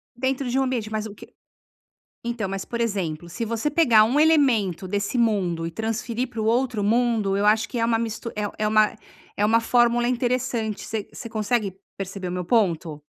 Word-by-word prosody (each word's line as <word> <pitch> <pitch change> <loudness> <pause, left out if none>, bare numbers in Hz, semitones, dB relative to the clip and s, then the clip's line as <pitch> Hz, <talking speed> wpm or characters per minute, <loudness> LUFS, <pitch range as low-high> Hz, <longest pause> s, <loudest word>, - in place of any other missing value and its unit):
Dentro 260 +1 -1
de 260 +2 +1
um - - +3
ambiente, 240 -5 -2
mas 215 0 -2
o 215 - -7
que - - -15 0.9
Então, 235 -4 -3
mas 195 0 -3
por 235 - -5
exemplo, 175 -8 -2
se 230 +6 -4
você 230 +5 -1
pegar 260 -9 +5
um 255 +6 +1
elemento 245 - +3
desse 205 +6 -2
mundo 190 -8 +1
e - - -6
transferir 225 +5 -2
para 230 -3 -5
o - - -1
outro 235 -1 +1
mundo, 225 -2 +2
eu 205 - +1
acho 215 +2 +3
que 245 - -3
é 230 - +2
uma 230 -1 +1
mist 225 0 -4
é 210 0 -3
é - - +2
uma 215 0 +3 0.4
é 205 - +1
uma 225 +2 +4
fórmula 240 +1 +3
interessante, 245 -3 -1
você 215 -2 -4
você 230 - -8
consegue 215 -3 -1 0.2
perceber 195 -1 -5
o - - -4
meu 180 0 -3
ponto? 170 -8 0
220 Hz, 200 wpm, -24 LUFS, 200-240 Hz, 0.9 s, pegar